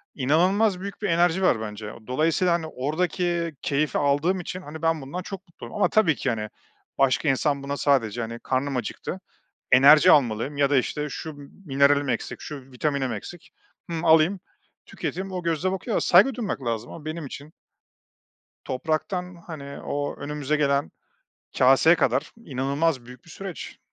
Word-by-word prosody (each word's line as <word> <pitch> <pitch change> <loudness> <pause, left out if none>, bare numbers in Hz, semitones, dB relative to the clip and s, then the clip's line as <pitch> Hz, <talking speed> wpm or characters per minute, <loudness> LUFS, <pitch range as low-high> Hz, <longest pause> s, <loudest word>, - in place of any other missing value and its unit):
inanılmaz 180 +9 +2
büyük 200 +2 -7
bir 205 - -1
enerji 175 +2 +3
var 115 -11 +3
bence. 105 0 -6
O 110 - -15
dolayısıyla, 160 +6 +2
hani, 165 -2 -1
oradaki 170 +4 -1
keyfi 140 -1 0
aldığım 145 +7 +1
için, 180 +1 -6
hani, 155 -1 -9
ben 165 -1 +1
bundan 155 +7 -5
çok 195 +1 -8
mutluyum 170 +6 -11
ama 210 - +2
tabii 210 -8 +3
ki, 135 - -2
hani, 110 -2 -2 0.5
başka 135 +2 +2
insan 140 +1 +1
buna 140 +1 -3
sadece, 120 -6 +1
hani, 115 +1 -5
"Karnım 130 +2 -1
acıktı, 125 - -5 0.5
enerji 150 +7 +8
almalıyım 125 +1 +2
ya 140 -1 +2
da, 145 - +4
işte, 150 +4 0
şu 160 - -6 0.3
mineralim 140 0 +3
eksik, 115 - -3
şu 135 -3 -8
vitaminim 135 -1 -1
eksik, 155 - -8 0.4
hımm, 165 0 -3
alayım, 160 +4 +4 0.5
tüketeyim." 190 +1 -5
o 180 -1 -3
gözle 170 +2 0
bakıyor 200 +4 -2
a - - +2
saygı 205 +9 +5
duymak 210 - -3
lazım. 115 0 -3
Ama 160 - -10
benim 155 0 -5
için 145 +3 -9 1.1
topraktan, 175 +6 -2
hani, 140 -4 -8
o 145 0 -3
önümüze 150 0 -2
gelen 140 -1 +1 0.7
kâseye 135 +6 +6
kadar - - 0
inanılmaz 135 0 -1
büyük 125 0 -13
bir 165 - -16
süreç. 195 -1 -8
150 Hz, 160 wpm, -25 LUFS, 135-175 Hz, 1.1 s, enerji